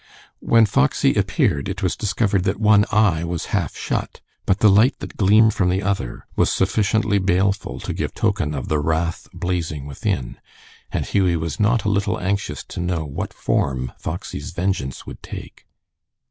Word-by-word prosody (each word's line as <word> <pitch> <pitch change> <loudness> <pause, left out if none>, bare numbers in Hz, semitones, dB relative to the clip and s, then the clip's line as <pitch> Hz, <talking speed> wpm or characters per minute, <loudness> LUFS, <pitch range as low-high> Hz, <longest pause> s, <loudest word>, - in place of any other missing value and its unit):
When 115 -1 +4
Foxy 70 -9 +2
appeared 70 -1 +1
it 95 +1 -5
was 90 - +1
discovered 105 -2 0
that 100 +1 0
one 105 -1 +5
eye 100 -7 +3
was 85 -1 -3
half 85 -9 -1
shut, - - -3 0.3
but 95 - +3
the 105 - +4
light 110 +7 +4
that - - -8
gleamed 110 +2 +5
from 90 -3 +1
the 95 +2 0
other 95 -11 -2
was - - +2
sufficiently 105 -1 +1
baleful 95 +1 0
to - - -4
give - - -3
token 100 -9 0
of 65 - -4
the 75 - +1
wrath 80 +3 -1
blazing 85 -5 -3
within, 65 -3 -3 0.5
and - - -1
Hughie 95 -4 +2
was 80 -2 -3
not 110 +1 +2
a 105 - 0
little 100 +2 0
anxious 100 +2 -2
to - - -6
know 85 -2 -1
what 70 - -5
form 65 -2 -1
Foxy's 80 -4 -5
vengeance 85 -8 -2
would - - -10
take. - - -10
95 Hz, 170 wpm, -21 LUFS, 80-105 Hz, 0.5 s, one